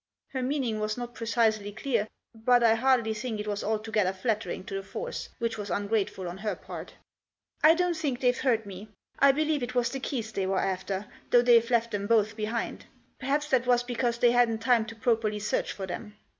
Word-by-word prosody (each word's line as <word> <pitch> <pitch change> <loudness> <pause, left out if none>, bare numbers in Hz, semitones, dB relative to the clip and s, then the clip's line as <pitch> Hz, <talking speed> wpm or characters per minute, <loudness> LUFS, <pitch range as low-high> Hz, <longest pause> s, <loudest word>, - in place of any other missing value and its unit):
Her 260 - -3
meaning 255 -4 -1
was 215 +1 -2
not 240 0 -5
precisely 220 -3 +1
clear, 225 -1 -1 0.3
but 240 +2 +3
I 225 -1 +6
hardly 235 -1 +2
think 220 0 -4
it 210 - -3
was 205 -1 -2
altogether 215 -2 0
flattering 215 0 -2
to 195 - -8
the 195 - -2
force, 445 - -6
which 230 -2 -2
was 205 -1 -5
ungrateful 200 -2 -1
on 175 +2 -6
her 210 +1 -2
part - - -9 0.3
" - - -40
I 315 +2 +8
don't 355 0 +1
think 290 -6 -2
they've 250 -1 +3
hurt 230 -5 +2
me. 200 +2 -9 0.3
I 280 - +7
believe 305 +1 0
it 250 +1 -4
was 240 -1 +2
the 270 - -4
keys 240 -5 -3
they 195 -3 -1
were 190 0 0
after, 190 +1 -2 0.2
though 245 0 +5
they've 235 -1 +5
left 235 -1 +2
them 200 -1 -2
both 215 -2 +3
behind. 225 +2 -3 0.3
Perhaps 290 +3 -1
that 255 -2 +2
was 245 -1 +4
because 245 -1 -1
they 240 0 +4
hadn't 240 -2 +3
time 235 -2 +3
to 230 - -8
properly 225 -3 +1
search 210 +1 -1
for 195 - -5
them." 210 +3 -7
230 Hz, 210 wpm, -28 LUFS, 210-250 Hz, 0.3 s, I